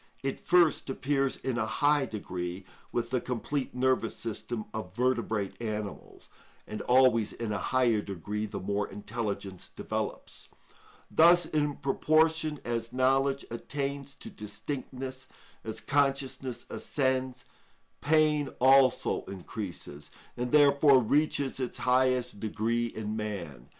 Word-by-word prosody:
It 135 0 -2
first 175 -5 +3
appears 135 0 0
in 125 -2 -2
a 110 - 0
high 145 +3 +2
degree 90 -3 -5 0.3
with 120 0 -2
the 125 -2 +1
complete 130 +2 -3
nervous 130 -3 +1
system 110 0 -4
of 100 -4 -6
vertebrate 115 -5 -1
animals, 105 -3 -5 0.4
and 105 - -6
always 125 -4 +4
in 115 -2 -4
a 100 - -1
higher 120 -4 +2
degree 105 +3 -4
the - - -5
more 100 +2 -1
intelligence 100 -2 -5
develops. - - -5 0.6
Thus, 170 +1 +6
in 150 -2 0
proportion 155 +1 +2
as 115 -1 -2
knowledge 135 +2 +2
attains 140 +3 -4
to - - -9
distinctness, 130 +4 -6 0.4
as 110 - -5
consciousness 135 -3 0
ascends, 130 -2 -1 0.6
pain 150 -1 +3
also 130 0 +4
increases, 90 -6 -7 0.3
and 125 0 -2
therefore 140 0 +6
reaches 140 +2 +1
its 125 -2 -3
highest 125 -2 +2
degree 115 +2 -1
in 110 -2 -5
man. 85 - -5
125 Hz, 120 wpm, -29 LUFS, 110-140 Hz, 0.6 s, Thus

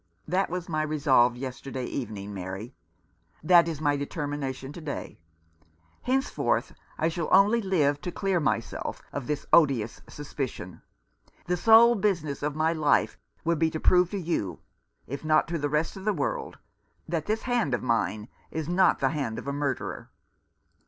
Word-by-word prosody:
" 95 - -40
That 195 - +1
was 180 0 -4
my 155 -2 -1
resolve 140 -6 +3
yesterday 130 0 -5
evening, 105 -6 -5
Mary. 95 +6 -6 0.7
That 170 0 +6
is 160 -4 -3
my 145 -2 +2
determination 140 -2 -4
to 170 - -9
day. 150 -2 -6 0.8
Henceforth 265 +2 0 0.2
I 160 - +1
shall 165 -1 -2
only 205 +5 +5
live 150 -8 +1
to 180 - -4
clear 195 -2 0
myself 115 -7 -2
of 140 -4 -4
this 150 -1 -2
odious 135 -9 +3
sus 145 -1 -10
picion. 115 - -5 0.6
The 180 - 0
sole 225 +5 +7
business 180 -9 -1
of 145 0 -2
my 160 +1 +2
life 155 -3 +2 0.2
will 170 0 +1
be 160 +1 +2
to 160 - -4
prove 180 +1 +4
to 200 - -3
you, 155 - -2 0.5
if 140 +5 -6
not 155 +1 +3
to 170 -1 -2
the 145 0 -1
rest 150 +2 0
of 190 0 -9
the 210 - +2
world, 145 -7 -3 0.5
that 160 -2 -2
this 220 +1 -1
hand 240 - +1
of - - -6
mine 115 -3 0 0.2
is 160 -2 -4
not 180 +2 +3
the - - +3
hand 140 -8 -3
of - - -7
a 140 - -1
murderer. 140 -3 -3
150 Hz, 170 wpm, -27 LUFS, 135-175 Hz, 0.8 s, sole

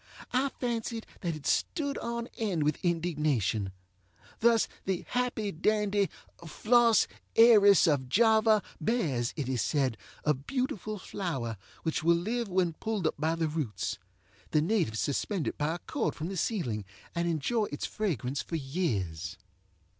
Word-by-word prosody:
I 265 +2 +2
fancied 230 -2 -2
that 170 -3 -2
it 150 - -10
stood 285 -3 0
on 235 0 -3
end 195 -9 0
with 150 0 0
indignation. 150 - 0 0.7
Thus 230 -1 +4 0.2
the 190 -2 -1
happy 245 -4 -1
dandy 205 +2 +1 0.3
Flos 230 +7 +4 0.3
Aeris 210 -5 +8
of 140 -6 +1
Java 220 - +4 0.2
bears, 150 - 0
it 145 -4 -2
is 130 -3 0
said, 130 -7 0 0.2
a 150 - +3
beautiful 215 - -3
flower, 155 - -3 0.3
which 160 -1 -1
will 170 +1 +5
live 230 +6 -2
when 180 -2 +1
pulled 210 +1 -3
up 155 - +2
by 160 +2 +1
the 165 -1 0
roots. 150 -8 -3 0.5
The 155 - +3
natives 165 - +1
suspend 165 +5 -1
it - - -2
by 150 +3 0
a - - -4
cord - - -2
from 160 +3 -4
the 195 - -4
ceiling 125 - -1 0.3
and 170 0 0
enjoy 175 - +1
its 145 -6 -4
fragrance 140 - -2
for 165 - -5
years. 100 - -2
170 Hz, 145 wpm, -30 LUFS, 145-220 Hz, 0.7 s, Aeris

